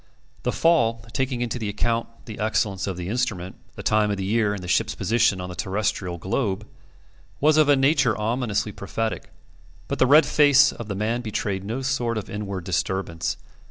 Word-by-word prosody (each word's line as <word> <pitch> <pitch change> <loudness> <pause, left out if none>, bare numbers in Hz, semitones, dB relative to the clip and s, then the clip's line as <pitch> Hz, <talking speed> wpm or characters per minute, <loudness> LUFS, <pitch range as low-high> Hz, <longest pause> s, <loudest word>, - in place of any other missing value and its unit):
The - - -1
fall 115 -9 +2
taking 130 -2 -1
into 120 0 -2
account 115 +3 -1 0.2
the 110 - -8
excellence 105 -3 0
of 95 -3 -3
the 90 -1 -5
instrument, 100 -5 -2 0.2
the - - -8
time 105 0 +2
of 100 - -1
the 95 - -3
year, 105 +1 +1
and 100 -3 -5
the - - -6
ship's 90 - +1
position 115 -4 +2
on 90 - -5
the - - -6
terrestrial 95 -1 -2
globe 95 - -2 0.7
was 150 +1 +4
of 155 -1 +4
a 145 - +7
nature 135 -4 +2
ominously 110 -1 -1
prophetic; 110 +3 -4 0.6
but - - -3
the 130 - +5
red 150 +3 +7
face 145 -1 +5
of 115 - -8
the 100 - -3
man 110 +4 -1
betrayed 100 -4 -3
no 115 +6 -4
sort 125 -4 -1
of 110 - -5
inward 100 -3 -4
disturbance. 90 -1 -2
110 Hz, 185 wpm, -24 LUFS, 95-125 Hz, 0.7 s, a